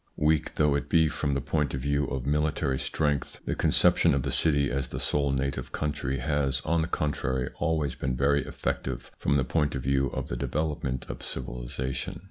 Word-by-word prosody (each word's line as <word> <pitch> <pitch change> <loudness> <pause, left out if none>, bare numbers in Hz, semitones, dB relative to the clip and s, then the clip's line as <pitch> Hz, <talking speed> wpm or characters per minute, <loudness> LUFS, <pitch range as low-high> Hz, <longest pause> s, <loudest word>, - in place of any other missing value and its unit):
Weak 75 -1 +2
though 75 -2 +3
it 70 0 -1
be 80 -2 +5
from 70 -2 -1
the 70 - 0
point 75 -2 0
of 65 - -3
view 70 +1 +1
of 65 -3 -3
military 75 -2 +1
strength, 75 -2 -1
the - - 0
conception - - +4
of 70 - 0
the - - -1
city 70 -4 +3
as 70 0 -1
the - - -5
sole 70 -1 +1
native 65 -1 -2
country 75 -3 -2
has, 70 0 0
on 85 0 +2
the 80 - -1
contrary, 65 -6 -1
always 80 -5 +1
been 65 -1 -2
very 70 +2 +3
effective 65 -1 -3
from 70 - +2
the 65 - +1
point 75 +2 +1
of 65 - -3
view 70 0 +2
of - - -4
the - - -3
develop 75 +4 -2
ment 65 -2 -2
of - - -6
civilisation. 60 +1 -4
70 Hz, 200 wpm, -28 LUFS, 65-75 Hz, -, be